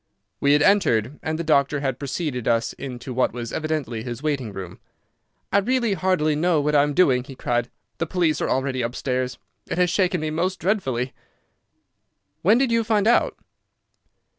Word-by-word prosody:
We 140 0 +4
had 145 0 +4
entered, 145 - +2
and 155 0 -2
the 170 - -3
doctor 145 -2 +2
had 135 -3 -2
preceded 140 -3 -3
us 115 -1 +1
into 130 -1 -7
what 130 +1 +1
was 120 -1 -6
evidently 155 -7 -2
his 120 +3 -6
waiting 140 -7 -1
room. 95 -3 -8 0.7
"I 200 - +6
really 240 0 +1
hardly 185 -6 +1
know 165 +1 +2
what 150 +1 0
I 145 - +6
am 145 0 0
doing," 130 -9 +4
he 135 +1 -11
cried. 120 -1 -1 0.3
"The 165 - -1
police 160 -4 +1
are - - 0
already 130 -1 0
upstairs. 125 +1 -2 0.3
It - - -3
has 180 -1 +3
shaken 180 -1 +1
me 155 0 -2
most 180 +4 -1
dreadfully." 135 - -1 1.3
"When 210 +6 +5
did 260 -2 +2
you 230 0 +2
find 215 -2 +1
it 230 - +6
out?" - - +2
150 Hz, 180 wpm, -23 LUFS, 125-180 Hz, 1.3 s, I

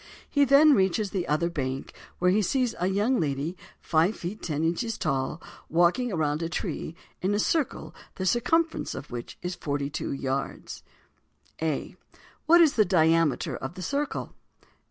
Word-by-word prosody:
He 285 -1 +3
then 285 +3 +7
reaches 195 -1 +1
the 185 -3 -2
other 155 +3 +1
bank, 135 -5 -4 0.2
where 180 0 +3
he 210 +3 +3
sees 245 +4 +1
a 180 - +1
young 210 +7 +1
lady 150 +2 -2 0.2
five 170 +6 +2
feet 185 +5 -6
ten 155 -2 -2
inches 210 +8 -1
tall, 135 +1 -1 0.3
walking 175 +9 +2
around 155 -3 0
a 165 - -2
tree, 165 0 -4 0.3
in 195 +3 +1
a - - 0
circle 295 +4 -1 0.2
the 185 - -3
circumference 320 - +1
of 135 - -8
which 120 -1 -7
is 180 +1 -2
forty 145 -4 -3
two 150 - -3
yards._ 135 0 -4 0.8
_A. 155 -3 -2 0.5
What 340 +2 +7
is 315 -4 +5
the 215 - +4
diameter 165 -5 +2
of 135 +6 -6
the 185 - -6
circle? 285 - -2
175 Hz, 160 wpm, -27 LUFS, 150-225 Hz, 0.8 s, then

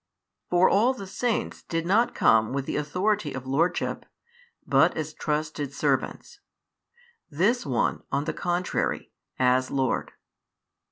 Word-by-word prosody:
For 180 +1 +5
all 240 +6 +3
the 200 - -7
saints 230 +4 -2
did 165 0 -3
not 215 +7 +2
come 110 +1 +4
with 140 -1 -2
the - - -3
authority 175 +3 0
of 130 -1 -6
lordship, 150 +7 0 0.6
but - - +3
as 155 -1 -3
trusted 150 -2 -3
servants; - - -1 0.9
This 190 - +1
One, 125 -3 0
on 140 +1 0
the 150 - -3
contrary, 175 +1 -2 0.3
as 130 0 +2
Lord. 135 -2 -1
155 Hz, 125 wpm, -26 LUFS, 135-185 Hz, 0.9 s, For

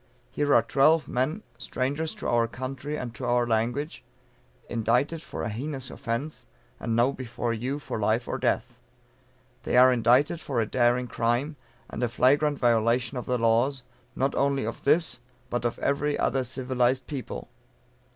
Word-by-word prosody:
Here 145 -1 0
are 115 - +5
twelve 150 +6 +3
men, 145 - -1 0.2
strangers 145 +5 -2
to - - -5
our 120 -1 +2
country 130 +4 -5
and 120 -4 -5
to 130 - -9
our 120 0 +2
language, 120 +6 -1 0.6
indicted 125 +8 0
for - - -6
a - - -2
heinous 130 +4 -5
offence, 135 +4 -4 0.3
and 115 - -2
now 120 +3 +3
before 120 -2 -3
you 125 +5 -2
for 145 - -5
life 110 +3 +1
or - - -3
death. - - -1 0.8
They - - 0
are 130 +1 +7
indicted 125 +7 +3
for 130 -4 -2
a 110 - +2
daring 120 +2 +2
crime, 120 +6 -1 0.3
and - - -6
a 120 - +1
flagrant 145 +5 +3
violation 120 +1 +2
of 125 - -5
the 125 - +1
laws, 120 +4 +2 0.3
not 135 +2 0
only 140 -3 +1
of 115 - -6
this, 155 0 +3 0.3
but 120 0 -1
of 120 - -1
every 145 +1 0
other 135 -1 +1
civilized 130 0 0
people." 140 -5 -6
125 Hz, 160 wpm, -27 LUFS, 120-140 Hz, 0.8 s, are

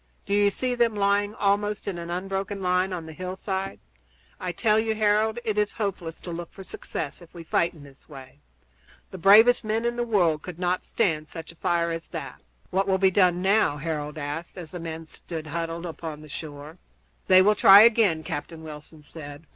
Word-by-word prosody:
Do 200 - -2
you 205 0 +4
see 250 +5 -2
them 235 -2 +1
lying 205 +1 +1
almost 205 +1 0
in 185 -3 -3
an 170 0 -7
unbroken 195 +3 -3
line 185 0 +1
on 175 -3 -4
the 160 - -9
hillside? 190 - -4 0.6
I 180 - -3
tell 215 +4 +2
you, 220 0 0
Harold, 215 +1 +2
it 215 -2 0
is 210 0 0
hopeless 190 -6 -4
to 175 - -7
look 170 0 -6
for 195 - -11
success 160 -3 -6
if 170 - -15
we 170 - -8
fight 170 +1 0
in 150 - -13
this 140 +1 -17
way. 135 - -12 0.7
The 190 - -8
bravest 220 +8 +6
men 220 +2 -1
in 240 0 -1
the 240 - 0
world 175 -10 +2
could 180 0 -8
not 180 0 -1
stand 160 -8 0
such 165 0 -8
a - - -19
fire 170 0 0
as 165 0 -5
that." - - -7 0.3
"What 195 +2 +1
will 190 -1 +2
be 190 0 +3
done 180 -2 +3
now?" 195 -6 +3
Harold 150 -1 -4
asked 155 +5 -5
as 170 -3 -8
the 180 - -6
men 165 -1 -6
stood 160 0 -8
huddled 165 +2 -4
upon 160 -2 -7
the 155 - -13
shore. 150 +2 -8 0.5
"They 185 0 +7
will 210 +2 +5
try 200 0 +9
again," 215 -8 +4
Captain 160 +2 -6
Wilson 150 0 -11
said. 145 0 -10
180 Hz, 205 wpm, -25 LUFS, 160-205 Hz, 0.7 s, try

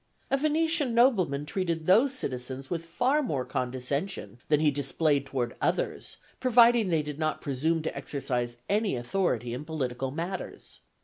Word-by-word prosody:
A 275 - +4
Venetian 310 -3 +2
nobleman 185 - +3
treated 170 -1 -2
those 225 - +5
citizens 130 - -5
with 165 -1 -2
far 250 - +1
more 140 - -2
condescension 130 +4 -3
than 150 -1 +3
he 150 -1 +4
displayed 140 0 0
toward 125 -3 -2
others, - - -1 0.2
provided 235 -4 +5
they 160 -3 +2
did 150 0 -6
not 155 -1 0
presume 155 +4 0
to - - -3
exercise 120 -4 -2
any 210 -4 +1
authority 120 - -1
in 130 +4 -4
political 135 -5 -3
matters. 170 +7 -5
155 Hz, 145 wpm, -28 LUFS, 135-215 Hz, 0.2 s, those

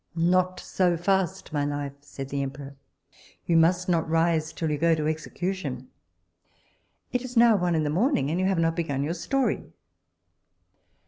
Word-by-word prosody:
Not 185 +2 +2
so 180 -2 +1
fast, 185 -2 -1
my 145 -1 0
life, 145 -1 -3
said 135 -1 -8
the 140 0 -2
emperor, 140 0 -6 0.7
you 170 - +1
must 175 +3 +3
not 165 -3 +1
rise 165 -1 +1
till 160 -2 -2
you 150 - -1
go 165 +1 +4
to 155 -1 -2
execution; 155 -4 -4 1.2
it 250 - 0
is 250 -1 -6
now 230 -1 +7
one 175 -3 +1
in 155 - +1
the 150 - -1
morning, 180 - +1
and 170 - -1
you 185 - +2
have 190 -2 +1
not 165 0 +1
begun 145 -5 -1
your 155 +4 -1
story. 270 +10 -1
165 Hz, 170 wpm, -26 LUFS, 145-185 Hz, 1.2 s, now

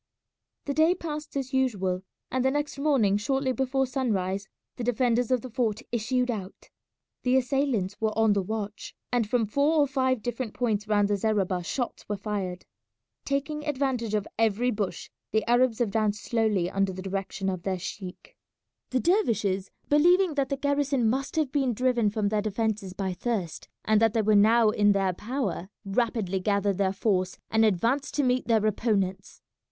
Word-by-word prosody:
The 280 - -1
day 320 +5 +4
passed 305 -4 -5
as 270 0 -4
usual, 195 -9 0 0.3
and 255 0 0
the 265 - +3
next 290 0 -2
morning 260 -9 +3
shortly 265 +5 0
before 265 +1 0
sunrise 200 -7 -1 0.3
the 245 - -4
defenders 245 0 +1
of 255 -2 +2
the 255 - -8
fort 230 0 -1
issued 245 +2 0
out. 195 -4 -8 0.5
The 255 +1 +3
assailants 250 -7 0
were 220 -1 0
on 220 -2 +4
the 200 - +1
watch, 210 +1 -5 0.2
and 235 -4 +1
from 235 -1 +2
four 280 +9 +2
or 295 - +5
five 260 -4 0
different 240 -2 -4
points 220 -4 -1
round 205 -1 +3
the 205 0 +1
zareba 195 -4 0
shots 245 +5 -4
were 205 - -1
fired. 195 -3 -4 0.6
Taking 280 +2 -2
advantage 260 -7 -1
of 210 -1 -1
every 225 +3 +2
bush 205 -4 -4 0.2
the 220 +1 0
Arabs 240 -1 +3
advanced 215 -2 0
slowly 215 -6 +1
under 195 +1 0
the 185 0 -7
direction 195 0 -3
of 185 -2 -2
their 190 +1 -2
sheik. 185 - -8 0.5
The 255 - +1
dervishes, 225 - +1 0.2
believing 350 +4 +4
that 275 -2 0
the 275 - -1
garrison 280 -3 +1
must 270 +2 -3
have 310 -5 +1
been 270 -5 +1
driven 245 -2 +2
from 205 -1 -1
their 210 0 +1
defences 215 -2 -2
by 190 -1 -2
thirst, 190 -4 -3 0.2
and 215 0 +3
that 225 -1 +3
they 225 - +2
were 215 +1 +3
now 220 +2 +5
in 205 -1 +4
their 195 -2 +1
power, 210 -4 -3 0.2
rapidly 200 -2 0
gathered 200 0 0
their 190 -1 +2
force 190 -2 0
and 220 0 +4
advanced 230 +8 +1
to 290 - +2
meet 250 -3 +1
their 220 -2 +3
opponents. 195 -3 -1
225 Hz, 175 wpm, -27 LUFS, 200-260 Hz, 0.6 s, or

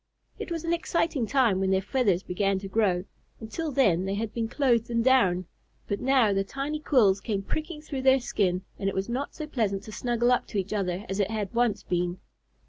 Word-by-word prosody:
It - - -5
was 335 -1 -3
an 335 0 0
exciting 330 -7 0
time 240 -8 +3
when 190 0 +1
their 190 0 +3
feathers 200 -3 +1
began 195 +2 0
to 195 +1 -6
grow. 190 -3 +1 0.3
Until 270 +9 -4
then 195 -10 +3
they 195 +1 -1
had 220 +1 -3
been 230 -1 -1
clothed 240 -3 +1
in 230 -1 +1
down; 195 -9 +3 0.4
but 200 - -2
now 255 -6 +3
the 195 0 +1
tiny 275 +8 -4
quills 215 -10 +3
came 200 -3 -2
pricking 310 - -4
through 275 -3 -4
their 265 0 +5
skin, 185 -6 0 0.2
and 195 - 0
it - - -5
was 190 +3 -2
not 260 +4 -3
so 310 - -5
pleasant 215 -9 -1
to 215 - -9
snuggle 240 +2 +1
up 250 - +1
to 210 - -4
each 195 +2 -2
other 195 -1 -2
as 195 +1 -3
it 200 -1 +1
had 215 -2 -3
once 235 -3 +1
been. 175 0 -1
220 Hz, 220 wpm, -27 LUFS, 195-260 Hz, 0.4 s, their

